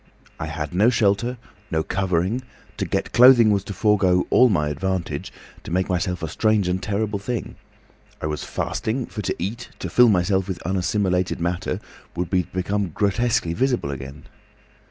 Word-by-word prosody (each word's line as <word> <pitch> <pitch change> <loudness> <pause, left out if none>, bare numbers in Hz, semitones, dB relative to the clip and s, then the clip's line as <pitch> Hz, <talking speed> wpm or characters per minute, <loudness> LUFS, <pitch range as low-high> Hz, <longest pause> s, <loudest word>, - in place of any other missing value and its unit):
I - - -3
had 75 -1 -5
no 105 +6 +4
shelter—no 115 -6 -1
covering—to 95 +8 -2
get - - -2
clothing 120 -3 +7
was 100 -2 +1
to 100 - -5
forego 95 -3 +2
all 125 0 +6
my 75 -7 +1
advantage, 90 +4 -3 0.3
to - - -8
make 95 +2 0
myself 90 -1 -1
a - - -1
strange 105 +4 +1
and 90 +1 -1
terrible 105 0 -1
thing. 120 +3 -4 0.7
I - - -4
was 75 -1 -3
fasting; 120 +3 -2
for 105 - -6
to 95 - -2
eat, 110 +7 -5
to - - -6
fill 125 -1 +6
myself 95 -1 +2
with 95 -3 -4
unassimilated 90 0 0
matter, 85 +1 -2 0.4
would 90 0 -3
be 95 -2 +3
to 85 - -13
become 95 +1 -1
grotesquely 105 -4 +1
visible 125 - 0
again." 70 +2 -8
95 Hz, 160 wpm, -23 LUFS, 90-110 Hz, 0.7 s, clothing